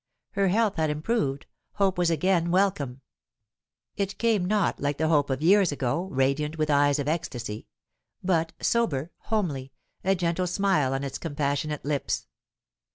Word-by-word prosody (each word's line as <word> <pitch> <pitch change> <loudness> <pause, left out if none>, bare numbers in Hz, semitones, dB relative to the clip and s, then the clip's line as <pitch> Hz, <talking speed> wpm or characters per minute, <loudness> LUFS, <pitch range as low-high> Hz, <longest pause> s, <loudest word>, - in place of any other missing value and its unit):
Her 195 -1 +1
health 210 +1 +2
had 160 -1 +1
improved; 150 - -1 0.3
hope 195 -3 +1
was 175 -1 +3
again 170 +1 +2
welcome. 170 -9 +1 0.9
It 200 0 -2
came 220 -6 +2
not 205 0 +1
like 145 0 -1
the 160 +1 +1
hope 145 -3 +3
of 135 +2 -2
years 195 0 +5
ago, 145 +5 -1
radiant, 140 +4 0
with 155 -1 +1
eyes 145 0 +4
of 145 -1 -2
ecstasy; 125 -9 -3 0.6
but 165 -3 +1
sober, 170 - 0 0.2
homely, 145 -12 -1 0.3
a 195 +1 +3
gentle 175 0 0
smile 180 -8 +1
on 135 - -2
its 135 -1 -4
compassionate 145 -1 -2
lips. 145 -1 -1
160 Hz, 150 wpm, -26 LUFS, 140-190 Hz, 0.9 s, years